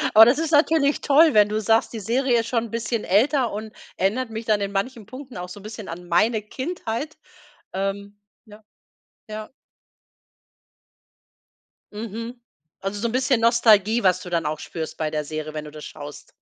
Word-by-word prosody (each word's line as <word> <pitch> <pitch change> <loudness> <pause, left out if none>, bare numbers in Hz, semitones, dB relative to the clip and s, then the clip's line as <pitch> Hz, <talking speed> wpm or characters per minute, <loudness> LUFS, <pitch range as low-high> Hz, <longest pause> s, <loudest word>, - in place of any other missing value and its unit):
Oh, 220 - +11
das 260 +6 +3
ist 325 0 -1
natürlich 295 -1 +3
toll, 310 +2 +5
wenn 210 -1 +5
du 215 +1 0
sagst: 225 +3 +2
„Die 225 - -4
Serie 240 +3 +1
ist 225 - -7
schon 235 -1 0
'n 225 - -11
bisschen 230 -1 -2
älter 245 +5 +2
und 215 +1 -6 0.3
erinnert 225 +6 0
mich 220 +1 -6
dann 210 -2 +2
in 200 0 -2
manchen 215 +2 -3
Punkten 255 -1 -10
auch 180 0 -6
so 205 - -9
'n - - -15
bisschen 215 -1 -8
an 175 +1 -8
meine 215 +6 +2
Kindheit.“ 265 - -5 0.6
Ähm 200 +1 -3 0.3
ja, 210 0 -15 0.7
ja. 215 0 -6 2.4
Mhm. 230 +3 -6 0.4
Also 195 +1 -3
so 235 - 0
'n - - -3
bisschen 255 -1 +2
Nostalgie, 230 -1 +4
was 185 -1 +3
du 180 - -8
dann 165 -2 0
auch 155 +1 -2
spürst 160 -2 -6
bei 155 -1 -1
der 150 -1 -1
Serie, 155 +1 -5
wenn 155 0 -5
du 150 - -9
das 150 0 -9
schaust. 145 0 -10
220 Hz, 185 wpm, -23 LUFS, 195-240 Hz, 2.4 s, Oh